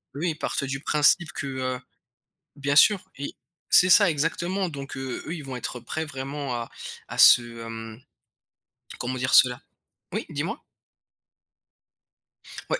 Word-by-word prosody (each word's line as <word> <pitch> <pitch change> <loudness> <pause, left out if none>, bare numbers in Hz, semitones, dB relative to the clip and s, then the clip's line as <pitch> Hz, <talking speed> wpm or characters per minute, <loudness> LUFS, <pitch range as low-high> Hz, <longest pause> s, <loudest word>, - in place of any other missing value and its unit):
Eux 150 - -5
ils 160 -3 -1
partent - - -2
du 135 0 -3
principe 150 +3 +2
que, 140 - -5
heu 130 -1 -3 0.8
bien 140 0 -1
sûr 195 +6 +5
et 140 +1 -5 0.4
c'est 185 - +6
ça 200 +1 +7
exactement, 170 +5 -1
donc 140 -4 -7
heu, 130 -1 -5
eux 160 - -4
ils 155 - -8
vont 130 - -6
être 125 0 -5
prêt 155 +7 -4
vraiment 140 -1 -5
à 120 -1 -5 0.4
à - - -8
se, 120 - +9 0.2
hem, 115 0 -8 1.0
comment 130 +1 -3
dire 130 +1 -2
cela? 125 -1 +5 0.5
Oui? - - -3
Dis-moi. - - -4 2.1
Ouais, - - +1
140 Hz, 145 wpm, -25 LUFS, 130-155 Hz, 2.1 s, se